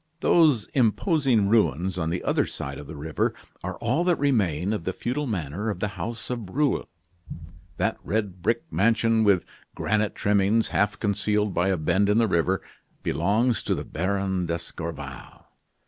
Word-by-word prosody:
Those 150 Hz, -, +4 dB
imposing 130 Hz, -, +2 dB
ruins 90 Hz, -, +2 dB
on 80 Hz, -2 st, -1 dB
the 90 Hz, +2 st, -2 dB
other -, -, +1 dB
side 70 Hz, 0 st, -6 dB
of 75 Hz, -, -9 dB
the 80 Hz, -, -8 dB
river 75 Hz, +1 st, -1 dB, 0.3 s
are -, -, -4 dB
all 130 Hz, +9 st, 0 dB
that 180 Hz, -1 st, +4 dB
remain 100 Hz, -, +1 dB
of 105 Hz, -, -3 dB
the 95 Hz, -, -2 dB
feudal 140 Hz, +8 st, -2 dB
manor 95 Hz, -, -3 dB
of 100 Hz, -4 st, -3 dB
the 105 Hz, -, -1 dB
house 115 Hz, +3 st, -5 dB
of 125 Hz, -, -2 dB
Breulh. 140 Hz, +8 st, 0 dB, 0.9 s
That -, -, 0 dB
red 100 Hz, -4 st, -2 dB
brick 115 Hz, -, +1 dB
mansion, 115 Hz, +1 st, +3 dB
with 100 Hz, -4 st, +3 dB, 0.3 s
granite 110 Hz, 0 st, 0 dB
trimmings, 105 Hz, +2 st, +2 dB
half 105 Hz, -1 st, +1 dB
concealed 105 Hz, -1 st, 0 dB
by 90 Hz, +2 st, +1 dB
a 95 Hz, -1 st, +2 dB
bend 90 Hz, +6 st, +2 dB
in 105 Hz, -, +3 dB
the 115 Hz, -1 st, +4 dB
river, 90 Hz, +1 st, +1 dB, 0.4 s
belongs 105 Hz, -, +1 dB
to -, -, 0 dB
the -, -, -5 dB
Baron 95 Hz, 0 st, -1 dB
d'Escorval. 85 Hz, -5 st, -6 dB
100 Hz, 160 wpm, -25 LUFS, 90-115 Hz, 0.9 s, Those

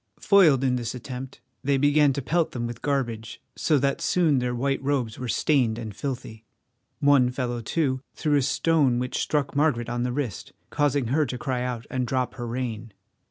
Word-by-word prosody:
Foiled 165 Hz, -10 st, +5 dB
in 125 Hz, -1 st, +2 dB
this 120 Hz, 0 st, -4 dB
attempt 125 Hz, +1 st, -8 dB, 0.2 s
they 140 Hz, 0 st, +2 dB
began 145 Hz, +1 st, +4 dB
to 140 Hz, -, -4 dB
pelt 165 Hz, +4 st, 0 dB
them 120 Hz, -1 st, -3 dB
with 120 Hz, 0 st, -6 dB
garbage, 120 Hz, -6 st, -2 dB, 0.2 s
so 155 Hz, -, +2 dB
that 140 Hz, 0 st, 0 dB
soon 160 Hz, -7 st, +2 dB
their 125 Hz, 0 st, -1 dB
white 135 Hz, +2 st, -1 dB
robes 135 Hz, -5 st, -1 dB
were 125 Hz, -, -4 dB
stained 120 Hz, -4 st, +2 dB
and 110 Hz, -4 st, -6 dB
filthy. 125 Hz, -5 st, -5 dB, 0.6 s
One 140 Hz, -3 st, +5 dB
fellow, 125 Hz, -2 st, -3 dB
too, 130 Hz, +1 st, -1 dB
threw 150 Hz, -1 st, +1 dB
a -, -, +3 dB
stone 140 Hz, -2 st, +2 dB
which 125 Hz, +1 st, -2 dB
struck 145 Hz, -2 st, -1 dB
Margaret 140 Hz, -6 st, +1 dB
on 120 Hz, 0 st, -2 dB
the 125 Hz, 0 st, -1 dB
wrist, 125 Hz, -5 st, -4 dB, 0.2 s
causing 145 Hz, -4 st, +1 dB
her 150 Hz, +2 st, +2 dB
to 125 Hz, -, -4 dB
cry 130 Hz, -2 st, -2 dB
out 125 Hz, -2 st, -3 dB
and 125 Hz, -2 st, -1 dB
drop 130 Hz, 0 st, -1 dB
her 120 Hz, -2 st, -6 dB
rein. 115 Hz, -3 st, -4 dB
130 Hz, 190 wpm, -25 LUFS, 120-145 Hz, 0.6 s, Foiled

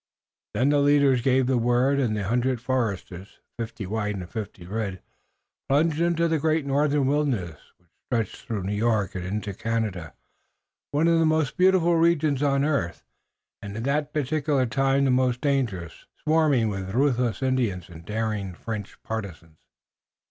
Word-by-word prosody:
Then 130 Hz, +3 st, +3 dB
the 145 Hz, 0 st, +3 dB
leaders 140 Hz, -3 st, +4 dB
gave 130 Hz, 0 st, +3 dB
the 130 Hz, -1 st, +2 dB
word 125 Hz, +4 st, +2 dB
and 115 Hz, -6 st, 0 dB
the 105 Hz, -, -2 dB
hundred 125 Hz, +4 st, 0 dB
foresters, 100 Hz, -6 st, -3 dB, 0.2 s
fifty 115 Hz, -2 st, -5 dB
white 105 Hz, +1 st, -2 dB
and 90 Hz, -3 st, -6 dB
fifty 100 Hz, -3 st, -7 dB
red, 100 Hz, -1 st, -3 dB, 0.7 s
plunged 155 Hz, +3 st, +2 dB
into 170 Hz, 0 st, +2 dB
the 160 Hz, -1 st, +1 dB
great 155 Hz, 0 st, +1 dB
northern 140 Hz, 0 st, +2 dB
wilderness 130 Hz, -, 0 dB, 0.2 s
which 90 Hz, -2 st, -35 dB, 0.2 s
stretched 115 Hz, -5 st, -3 dB
through 110 Hz, -5 st, -3 dB
New 100 Hz, +2 st, -2 dB
York 105 Hz, -3 st, 0 dB
into 100 Hz, +3 st, -3 dB
Canada, 105 Hz, -6 st, -3 dB, 0.7 s
one 150 Hz, +3 st, +2 dB
of 165 Hz, -1 st, +4 dB
the 165 Hz, -, +3 dB
most 155 Hz, -3 st, +1 dB
beautiful 180 Hz, -2 st, +4 dB
regions 160 Hz, -4 st, +2 dB
on 140 Hz, -1 st, +2 dB
earth, 90 Hz, -, -1 dB, 0.6 s
and 100 Hz, +1 st, -7 dB
at 115 Hz, -, -4 dB
that 145 Hz, +2 st, 0 dB
particular 145 Hz, -2 st, 0 dB
time 135 Hz, +4 st, +2 dB
the 135 Hz, -, +3 dB
most 125 Hz, -1 st, +2 dB
dangerous, 120 Hz, -, -2 dB, 0.2 s
swarming 155 Hz, -7 st, +3 dB
with 95 Hz, 0 st, -4 dB
ruthless 125 Hz, -2 st, +1 dB
Indians 120 Hz, -9 st, 0 dB
and 85 Hz, -2 st, -12 dB
daring 105 Hz, -2 st, -3 dB
French 105 Hz, 0 st, -6 dB
partisans. 85 Hz, -8 st, -6 dB
125 Hz, 155 wpm, -25 LUFS, 105-145 Hz, 0.7 s, leaders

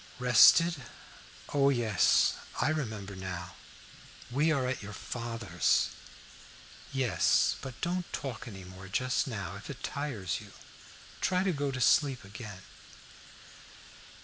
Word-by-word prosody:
"Rested? 130 Hz, +7 st, +6 dB, 0.8 s
O, 140 Hz, -1 st, +4 dB
yes, 115 Hz, -7 st, +3 dB, 0.3 s
I -, -, +2 dB
remember 110 Hz, -10 st, -3 dB
now. 90 Hz, -2 st, -6 dB, 0.8 s
We 150 Hz, +6 st, +2 dB
are 135 Hz, -4 st, +1 dB
at 130 Hz, +1 st, -2 dB
your 105 Hz, 0 st, -8 dB
father's." 115 Hz, -2 st, 0 dB, 1.0 s
"Yes; 130 Hz, -7 st, +2 dB
but 130 Hz, -2 st, -8 dB
don't 175 Hz, +1 st, -2 dB
talk 125 Hz, -3 st, -5 dB
any 95 Hz, -4 st, -8 dB
more 95 Hz, +1 st, -11 dB
just 125 Hz, +8 st, 0 dB
now, 100 Hz, -7 st, -5 dB
if 105 Hz, -, -11 dB
it 140 Hz, -, -8 dB
tires 120 Hz, -, -3 dB
you. -, -, -13 dB, 0.7 s
Try 185 Hz, 0 st, +2 dB
to 190 Hz, -2 st, +1 dB
go 145 Hz, -1 st, -1 dB
to 130 Hz, -1 st, -4 dB
sleep 135 Hz, 0 st, +3 dB
again." 100 Hz, -2 st, -9 dB
125 Hz, 120 wpm, -30 LUFS, 100-140 Hz, 1.0 s, Rested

